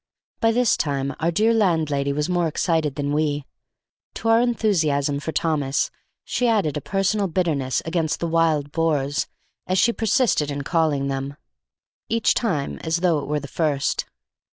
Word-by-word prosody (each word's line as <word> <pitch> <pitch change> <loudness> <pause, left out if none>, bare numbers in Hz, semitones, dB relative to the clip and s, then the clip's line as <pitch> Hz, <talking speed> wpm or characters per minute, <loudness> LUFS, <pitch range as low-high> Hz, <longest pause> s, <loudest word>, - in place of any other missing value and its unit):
By 225 - +3
this 245 0 +3
time 140 -1 -1
our 165 - +1
dear 215 +7 +2
landlady 160 -9 +1
was 150 +1 -1
more 175 -2 +1
excited 160 -2 0
than 145 0 -2
we. 150 -2 0 0.7
To 225 - -2
our 225 +1 +5
enthusiasm 160 - +1
for 160 - -4
Thomas 150 -4 0 0.3
she 250 - 0
added 205 -11 +1
a 150 - -3
personal 195 +4 0
bitterness 155 -7 0
against 165 -2 -1
the - - -2
Wild 160 -3 +1
Boars, 145 -3 0 0.4
as 185 - +1
she 235 +5 +4
persisted 225 - +1
in 140 0 -3
calling 155 -3 +1
them, 135 +1 -3 0.7
each 230 0 +2
time 165 - -1
as 165 +1 -1
though 170 -4 +3
it 140 - -6
were 150 +1 0
the 140 - -8
first. 145 -1 0
160 Hz, 160 wpm, -23 LUFS, 145-185 Hz, 0.7 s, our